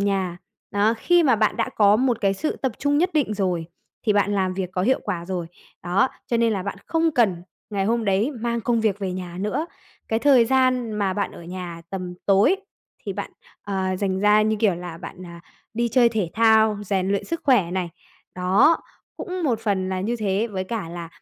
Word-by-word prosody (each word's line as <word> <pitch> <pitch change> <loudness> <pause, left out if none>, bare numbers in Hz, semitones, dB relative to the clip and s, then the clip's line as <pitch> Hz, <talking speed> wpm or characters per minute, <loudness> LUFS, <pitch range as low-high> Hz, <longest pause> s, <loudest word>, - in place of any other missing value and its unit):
nhà. 190 -3 -1 0.3
Đó, 210 +3 +2
khi 350 +4 +4
mà 255 -7 +4
bạn 215 0 +1
đã 230 - 0
có 205 0 +5
một 250 -2 +1
cái 195 -1 +2
sự 305 +10 -2
tập 265 -4 -2
trung 285 +1 +1
nhất 360 +3 +2
định 280 -9 +1
rồi 180 -5 -1 0.4
thì 210 - +4
bạn 205 0 +2
làm 185 -2 0
việc 185 -2 -3
có 180 -1 -1
hiệu 260 +6 +2
quả 170 -1 -3
rồi, 180 -2 -3 0.4
đó, 190 +8 +2 0.2
cho 235 - 0
nên 230 -1 +2
là 195 -3 -2
bạn 200 0 -4
không 325 0 +2
cần 195 -10 +2 0.3
ngày 195 -2 -1
hôm 230 +1 0
đấy 200 +7 +1
mang 235 -2 -2
công 230 0 +1
việc 210 -2 +1
về 190 -2 -3
nhà 180 -1 -6
nữa. 210 - -1 0.4
Cái 225 - +1
thời 260 -3 +5
gian 255 -2 +2
mà 200 -3 0
bạn 200 +1 -2
ở - - -11
nhà 175 -1 -7
tầm 185 -2 -5
tối 200 - +4 0.5
thì 200 - -3
bạn, 200 +1 -5 0.3
ờ, 190 -2 -2
dành 190 -1 -1
ra, 210 +1 +5
như 215 0 +1
kiểu 205 -5 +3
là, 175 -1 -7
bạn, 185 +1 -9
à, 170 0 -11 0.3
đi 235 +1 0
chơi 240 0 +4
thể 210 -7 -2
thao, 220 -2 +4
rèn 190 -1 0
luyện 200 0 0
sức 335 0 -4
khỏe 220 -11 +3
này. 180 -1 -2 0.5
Đó, 195 - +4 0.4
cũng 365 -1 -5
một 235 -6 +1
phần 190 -3 -1
là 190 -1 -2
như 230 +5 -1
thế 210 +1 0
với 190 -2 -3
cả 205 -3 -4
là, 170 -1 -7
205 Hz, 220 wpm, -23 LUFS, 185-235 Hz, 0.5 s, có